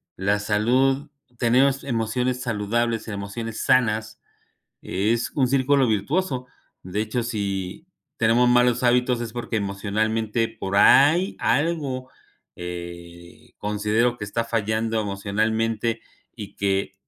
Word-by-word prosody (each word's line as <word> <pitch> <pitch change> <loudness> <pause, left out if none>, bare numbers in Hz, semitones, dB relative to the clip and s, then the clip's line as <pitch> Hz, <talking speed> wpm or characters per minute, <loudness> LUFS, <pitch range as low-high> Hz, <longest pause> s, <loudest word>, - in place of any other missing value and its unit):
la 100 +2 +1
salud 125 +7 +1 0.3
tenemos 130 +3 +3
emociones 125 +1 -1
saludables, 115 0 -1
emociones 110 +2 -5
sanas, 110 -3 +1 0.6
es 110 +5 -1
un 130 -4 +2
círculo 135 0 +3
virtuoso, 125 - -1 0.4
de 95 +4 -2
hecho, 110 +3 -2
si 100 - -4 0.3
tenemos 115 +1 +3
malos 125 0 +3
hábitos 125 0 +2
es 115 -1 -5
porque 120 -1 -3
emocionalmente 110 +3 -1
por 100 -3 -4
ahí 155 - +5
algo, 140 -2 0 0.5
eh, 85 -1 -9
considero 105 +3 0
que 105 - -5
está 115 +3 -2
fallando 110 0 -1
emocionalmente 110 +3 -1 0.3
y 105 -4 -9
que 95 0 -1
115 Hz, 110 wpm, -23 LUFS, 105-125 Hz, 0.6 s, ahí